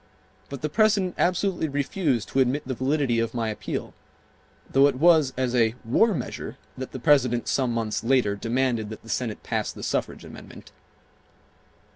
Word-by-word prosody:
But 140 0 -8
the - - +1
President 200 0 +2
absolutely 180 -2 +1
refused 140 - -1
to 135 - 0
admit 130 +2 +1
the 130 - -2
validity 130 -1 0
of 115 +1 -2
my 115 -2 -1
appeal, 105 - -5 0.7
though 135 +1 +5
it 140 - 0
was 155 -1 +4
as 130 -2 0
a 115 -2 +2
"war 205 - +3
measure" 125 - -6 0.2
that 130 0 -6
the - - -6
President 125 -4 +3
some 130 -3 +1
months 110 -3 -2
later 120 -4 +2
demanded 115 0 -1
that 110 - -9
the 115 - -14
Senate 115 -4 -3
pass - - -2
the - - -10
suffrage - - -2
amendment. - - -12
130 Hz, 165 wpm, -25 LUFS, 115-150 Hz, 0.7 s, though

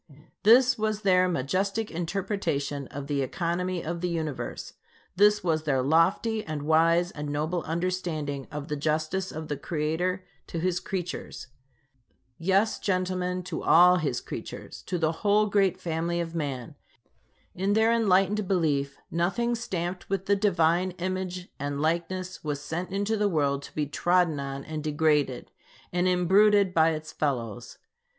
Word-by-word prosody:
This 245 +3 +6
was 215 -1 -1
their 185 -2 +4
majestic 190 +9 -1
interpretation 165 -6 -2
of 140 0 -7
the 140 -1 -1
economy 175 +5 -2
of 170 +1 -4
the 180 - 0
Universe. 160 -5 -4 0.4
This 210 +1 +4
was 160 -3 +1
their 135 -4 0
lofty, 180 - +2
and 155 -2 -5
wise, 165 +3 +3
and 150 0 -5
noble 155 +4 -1
understanding 165 -5 -2
of 150 0 -5
the 150 - -2
justice 155 +5 -1
of 155 0 -6
the 145 - -3
Creator 175 +5 -2 0.2
to - - -5
his 180 +1 0
creatures. 180 -8 -5 0.9
Yes, 195 +5 +2
gentlemen, 185 -1 -1
to 180 - -5
all 180 +2 +6
his 140 -8 -1
creatures, - - -8
to 180 - -1
the 160 -2 +1
whole 210 +1 +4
great 200 -3 +2
family 170 +1 -2
of 165 -1 -3
man. 140 -7 -4 0.8
In 195 +3 0
their 220 +2 +4
enlightened 200 -2 +2
belief, 145 -7 0
nothing 190 +8 0
stamped 180 -6 -4
with 195 -1 -1
the 200 - +3
Divine 180 -2 +2
image 185 0 -3
and 140 0 -3
likeness 170 +4 -2
was 145 -2 -2
sent 165 +5 -4
into 200 +3 -1
the 210 -1 +1
world 140 -5 +1
to - - -12
be 150 - 0
trodden 175 +1 +1
on 140 0 -5
and 155 -1 -5
degraded, 150 -4 +1 0.4
and 180 +1 +2
imbruted 195 +2 +4
by 160 -1 +5
its 155 -1 -4
fellows. 120 -8 -3
175 Hz, 150 wpm, -27 LUFS, 155-190 Hz, 0.9 s, This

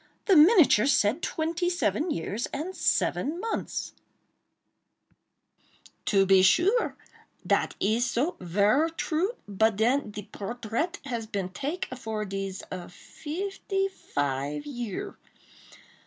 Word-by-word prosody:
The 390 - +5
miniature 310 - +6
said 255 +1 +3
twenty 335 +2 -1
seven 350 -1 0
years 205 - -2
and 330 +7 -5
seven 310 +6 0
months!" 450 +3 -3 2.1
"To 195 -2 +3
be 190 0 +6
sure!—dat 365 - +1
is 225 +5 +1
so!—ver 215 - +1
true! 350 +8 0
but 215 +2 +2
den 240 +4 +1
de 210 0 -7
portraite 230 - -4
has 235 -5 -4
been 200 -4 -3
take 290 - -3
for 220 -4 -4
dese 195 -1 -4 0.3
fifty 390 - -3
five 145 - -3
year. 240 -8 -5
240 Hz, 100 wpm, -27 LUFS, 200-330 Hz, 2.1 s, miniature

